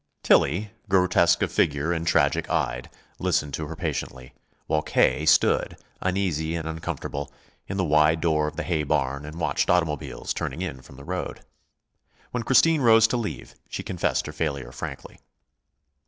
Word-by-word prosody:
Tillie, 100 +3 +3 0.2
grotesque 90 -2 +3
of - - -1
figure 75 +3 +1
and 85 0 -3
tragic 70 -5 +2
eyed, - - -1 0.3
listened 75 -2 0
to 80 +1 -3
her 80 - -7
patiently, 65 -4 -5 0.3
while 75 - +1
K. 75 0 +2
stood, 80 - +3 0.2
uneasy 90 -4 -1
and 80 -1 -4
uncomfortable, 75 -3 -5 0.4
in 95 - -4
the 95 - +1
wide 75 +1 +4
door 80 -2 +1
of - - -5
the 85 - -3
hay 80 0 0
barn 70 -1 -1
and 80 +3 -8
watched 80 - 0
automobiles 80 -5 0
turning 80 +7 -4
in 65 -8 -5
from 65 - -15
the 70 - -12
road. 90 +2 -4 0.9
When 125 - -2
Christine 150 +6 +4
rose 115 -2 +6
to 125 - 0
leave, 115 -3 -5 0.2
she - - -5
confessed - - -1
her 75 - -6
failure 70 -6 -3
frankly. 65 - -8
80 Hz, 160 wpm, -25 LUFS, 75-90 Hz, 0.9 s, rose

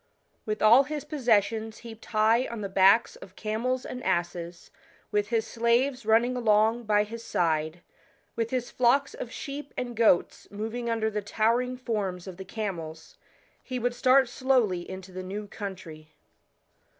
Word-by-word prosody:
With 215 0 -2
all 235 +6 +7
his 295 0 -4
possessions 225 -6 +1
heaped 225 -1 -11
high 225 +3 +2
on 235 -2 -6
the 200 - -4
backs 195 +4 +4
of 185 - -13
camels 235 +4 -2
and 250 - -6
asses, 175 -1 -3 0.4
with 205 -1 +1
his 225 -1 0
slaves 235 +2 0
running 235 +3 +3
along 225 0 +2
by 210 -1 +3
his 230 +2 -8
side, 160 -2 -1 0.5
with 230 -1 -1
his 250 -1 -2
flocks 260 +3 +2
t>f 240 - -6
sheep 285 +2 -7
and 245 -1 -4
goats 220 -6 +2
moving 225 +3 -4
under 220 -1 0
the 210 0 -2
towering 235 +5 0
forms 205 -8 -3
of 185 -3 -9
the 190 - -8
camels, 170 -7 -6 0.4
he 255 - -5
would 245 0 -1
start 260 +1 +4
slowly 235 -9 +1
into 190 0 -8
the 185 0 -6
new 200 +3 -5
country. 185 -7 -8
220 Hz, 155 wpm, -27 LUFS, 195-245 Hz, 0.5 s, all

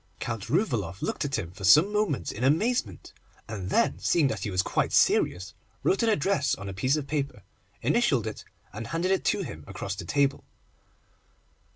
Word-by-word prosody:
Count 115 -4 -4
Rouvaloff 120 - -1
looked - - -2
at 140 0 -1
him 85 - -5
for 95 +2 -12
some 155 - +6
moments 210 -10 0
in 110 - -5
amazement, 150 - 0 0.3
and 95 -4 -5
then - - +2
seeing 155 -6 +2
that - - -3
he 110 - -3
was 90 -1 +1
quite - - 0
serious, 95 +3 +2 0.3
wrote 195 - +2
an 230 - +3
address 195 -5 +1
on 100 - -8
a 100 - -5
piece 130 +9 +1
of 150 -3 -3
paper, 140 -8 -3 0.4
initialled - - +2
it, - - -6 0.3
and 110 +3 -6
handed 170 +7 -1
it 190 - +1
to 205 -2 +1
him 80 - -8
across - - -5
the - - -6
table. 140 -1 +1
140 Hz, 185 wpm, -27 LUFS, 100-165 Hz, 0.4 s, some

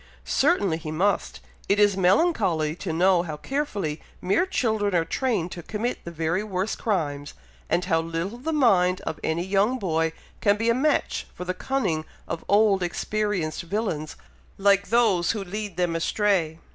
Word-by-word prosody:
"Certainly 195 - +2
he 160 -1 -6
must! 185 +6 0 0.3
It 200 +1 +3
is 205 -2 +5
melancholy 185 - +2
to 180 - -4
know 180 +2 +4
how 155 -3 -5
carefully 205 - -3 0.2
mere 200 - +1
children 220 - 0
are 165 -1 +2
trained 205 -3 -1
to 175 - -6
commit 220 +7 -3
the - - -4
very 165 +3 -1
worst 195 0 -2
crimes, 145 -9 -2 0.3
and 175 +2 +1
how 165 0 +2
little 165 +7 -4
the 315 +6 -3
mind 190 - +3
of 160 - -5
any 160 +2 0
young 200 +6 +2
boy 165 -6 0 0.3
can 205 -1 +3
be 230 +2 +2
a - - +3
match 285 +5 0
for 180 - -6
the 185 - -1
cunning 185 -7 -1 0.2
of 165 - -4
old, 205 -1 +4
experienced 190 -2 -1
villains 170 -5 -3 0.4
like 200 0 +3
those 220 -7 +3
who 210 -3 -4
lead 205 0 -5
them 175 -2 0
astray. 165 -2 +1
190 Hz, 165 wpm, -25 LUFS, 165-215 Hz, 0.4 s, is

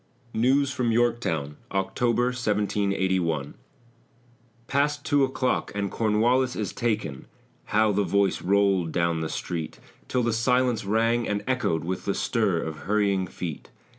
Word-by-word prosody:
NEWS 135 +4 +2
FROM 125 -4 0
YORKTOWN 110 -12 0
OCTOBER, 115 +5 0
1781 100 - 0 1.1
"Past 145 +2 0
two 145 -2 +3
o'clock 130 -1 0
and 100 -1 -2
Cornwallis 120 +4 +2
is 105 -4 -3
taken." 105 - -2 0.4
How 110 0 +2
the 100 0 +1
voice 100 0 +1
rolled 95 -3 +2
down 85 -1 0
the 80 - -2
street 85 -3 -4 0.3
Till 125 -1 0
the 115 -1 +1
silence 120 -1 +1
rang 115 +3 +1
and 105 0 -1
echoed 125 -11 0
With 90 +2 -4
the 100 - 0
stir 105 -8 +1
of 80 -1 -5
hurrying 100 -1 +1
feet! 85 -4 -6
105 Hz, 135 wpm, -26 LUFS, 95-120 Hz, 1.1 s, two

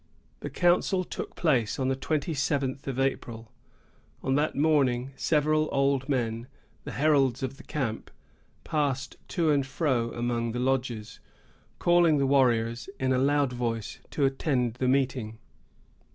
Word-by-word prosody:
The - - -5
council 180 +1 +2
took - - -7
place 130 -10 +1
on 130 - 0
the 135 - +1
twenty 150 +4 -2
seventh 140 -1 -1
of 135 -1 -3
April. 115 -4 -2 0.7
On 130 - +1
that 150 +3 +1
morning, 135 -4 +2
several 155 +1 +1
old 135 0 +1
men, 115 -3 -1 0.4
the - - -6
heralds 140 -4 +2
of 130 +1 -4
the 135 - -13
camp, 125 -7 -3 0.5
passed 140 -4 -1
to 165 -4 +1
and 140 -2 +2
fro 130 -4 -1
among 120 -1 -1
the 120 - -2
lodges, 125 -4 -2 0.6
calling 175 -3 +4
the 140 - +2
warriors, 120 -2 +2
in 130 -1 +1
a 125 - +2
loud 140 -1 +2
voice, 115 -3 -3
to 145 - 0
attend 135 -3 0
the 125 +2 -2
meeting. 125 -4 0
135 Hz, 145 wpm, -27 LUFS, 120-145 Hz, 0.7 s, calling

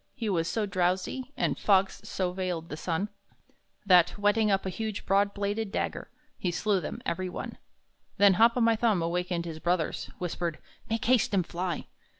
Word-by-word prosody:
He 230 -5 -3
was 165 -4 +1
so 220 +3 0
drowsy, 185 +7 -1
And - - 0
fogs 195 -1 +3
so 185 -2 -1
veiled 180 -3 -3
the - - -4
sun, 170 +5 -2 0.8
That, 180 -3 +5
whetting 205 +1 +3
up 195 -1 +1
a 190 - -2
huge, 220 0 -4
broad 200 +1 +3
bladed 205 +1 -2
dagger, - - -3 0.3
He 180 - 0
slew 195 +2 +1
them, - - -6
every 185 +2 -2
one. - - -6 0.6
Then 200 -1 +6
Hop 235 +1 +6
o' - - +2
my 230 0 +4
Thumb, 215 -6 +2
awakening 175 0 -1
his 165 -2 -6
brothers, 175 -1 -1
Whispered: 175 -2 -3 0.3
"Make 225 0 -1
haste 240 -3 +3
and 185 -3 +2
fly!" 175 0 -3
190 Hz, 175 wpm, -29 LUFS, 175-210 Hz, 0.8 s, Then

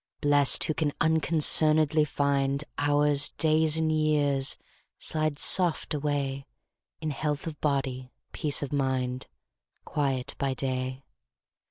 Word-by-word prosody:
Blest, 145 -1 +3
who 155 - +1
can 150 -2 -1
unconcern'dly 155 -1 +2
find 140 0 0 0.2
Hours, 145 0 +2
days, 160 0 +2
and 160 -1 +1
years, 145 -3 +2 0.4
slide 155 -2 -1
soft 175 0 +3
away 140 -2 -2 0.5
In 155 -1 -2
health 150 0 -3
of 155 -3 -7
body, 135 -3 -2 0.2
peace 150 -2 -2
of 140 - -5
mind, 130 -2 -1 0.6
Quiet 135 -4 -2
by 135 -2 -1
day. 130 0 -3
145 Hz, 115 wpm, -27 LUFS, 135-155 Hz, 0.6 s, Blest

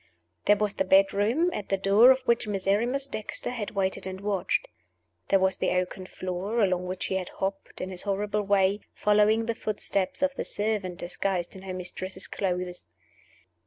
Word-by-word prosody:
There 205 - +6
was 210 0 -1
the - - 0
bedroom, 205 - +3
at 205 - -5
the 195 - +2
door 200 +5 +6
of 260 0 +5
which 235 -3 +1
Miserrimus 210 +7 +1
Dexter 230 -5 -4
had 230 -5 -4
waited 190 -1 0
and 190 0 -5
watched. 205 - 0 0.6
There 195 - +5
was 190 0 +2
the - - 0
oaken 185 +1 -2
floor 185 +6 -3
along 180 -2 +1
which 185 0 -3
he 190 - -1
had 185 -2 -4
hopped, 195 0 -4
in 185 - -4
his 180 - -1
horrible 205 +1 -1
way, 200 0 +2 0.2
following 210 +2 +3
the 230 - 0
footsteps 205 +1 -2
of 280 -1 +2
the - - -3
servant 205 -4 -2
disguised 180 0 -2
in 190 - -9
her 190 -1 -6
mistress's 185 +1 -4
clothes. 180 -2 -3
195 Hz, 175 wpm, -27 LUFS, 185-210 Hz, 0.6 s, There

